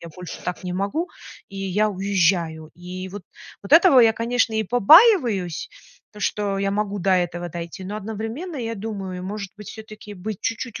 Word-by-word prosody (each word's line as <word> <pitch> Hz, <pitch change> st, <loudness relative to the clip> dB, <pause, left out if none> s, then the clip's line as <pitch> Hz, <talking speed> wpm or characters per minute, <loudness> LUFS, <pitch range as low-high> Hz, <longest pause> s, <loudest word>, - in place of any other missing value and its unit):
я 170 Hz, -, -9 dB
больше 180 Hz, +2 st, -9 dB
так 180 Hz, -, -4 dB
не 180 Hz, -, -3 dB
могу 200 Hz, -, -2 dB, 0.4 s
и 195 Hz, -, -11 dB
я 195 Hz, +2 st, 0 dB
уезжаю". 175 Hz, -5 st, 0 dB
И 180 Hz, +1 st, -7 dB
вот, 200 Hz, +1 st, -8 dB, 0.4 s
вот 200 Hz, -, -7 dB
этого 330 Hz, -3 st, +8 dB
я, 230 Hz, -2 st, +6 dB
конечно, 230 Hz, 0 st, 0 dB
и 220 Hz, -, +1 dB
побаиваюсь- 245 Hz, -, +5 dB, 0.4 s
то, 210 Hz, -, -12 dB
что 200 Hz, -1 st, -1 dB
я 195 Hz, 0 st, 0 dB
могу 205 Hz, 0 st, -2 dB
до 190 Hz, +2 st, +1 dB
этого 175 Hz, -1 st, 0 dB
дойти, 170 Hz, +2 st, -7 dB
но 200 Hz, +3 st, -5 dB
одновременно 225 Hz, -, -5 dB
я 230 Hz, -2 st, -4 dB
думаю: 195 Hz, -3 st, -5 dB
может 200 Hz, 0 st, -5 dB
быть, 210 Hz, -, -10 dB
всё-таки 215 Hz, -1 st, -10 dB
быть 200 Hz, +2 st, -6 dB
чуть-чуть 230 Hz, 0 st, -4 dB
200 Hz, 180 wpm, -23 LUFS, 185-225 Hz, 0.4 s, этого